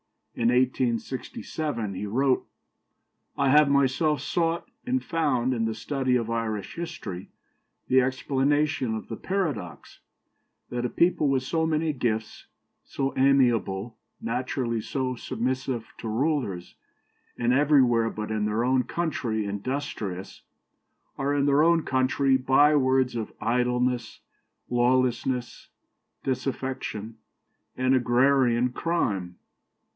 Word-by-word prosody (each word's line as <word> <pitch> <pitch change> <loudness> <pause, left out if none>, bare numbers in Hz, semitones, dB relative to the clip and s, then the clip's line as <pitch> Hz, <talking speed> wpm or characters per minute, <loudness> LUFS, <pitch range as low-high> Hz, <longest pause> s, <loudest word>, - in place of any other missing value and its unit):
In 115 - 0
1867 125 0 -1
he 95 +3 -4
wrote: 130 +5 +1 0.9
"I 140 -1 +2
have 150 +1 +6
myself 140 +1 +2
sought 165 0 -1 0.2
and 260 +1 0
found 130 -6 0
in 115 -2 0
the 110 -1 -2
study 130 +1 -1
of 115 -2 0
Irish 110 -3 -3
history 155 - -6 0.6
the 130 0 +5
explanation 135 0 0
of 110 - -7
the 115 - -5
paradox, 150 - -3 0.7
that 125 0 -2
a - - 0
people 170 -1 +2
with 135 -2 +1
so 160 +4 0
many 155 0 0
gifts, 110 -4 -3 0.4
so 135 -1 -3
amiable, 120 -6 +2 0.2
naturally 120 -1 -2
so 130 +2 -2
submissive 125 0 -2
to - - -6
rulers, 115 - -1 0.6
and 120 +1 +2
everywhere 130 -5 +4
but 105 0 -5
in 105 -1 0
their 105 +2 0
own 130 0 +2
country 120 -8 -2
industrious, 100 -3 -4 0.8
are 140 +1 0
in 140 -1 +2
their 140 +1 +4
own 165 0 +4
country 130 +1 +2
bywords 130 -1 +3
of 110 -3 -4
idleness, 125 0 0 0.5
lawlessness, 125 0 0 0.6
disaffection, 130 -4 -3 0.6
and 130 +1 +2
agrarian 125 -1 +3
crime." 100 - -1
130 Hz, 110 wpm, -26 LUFS, 115-140 Hz, 0.9 s, have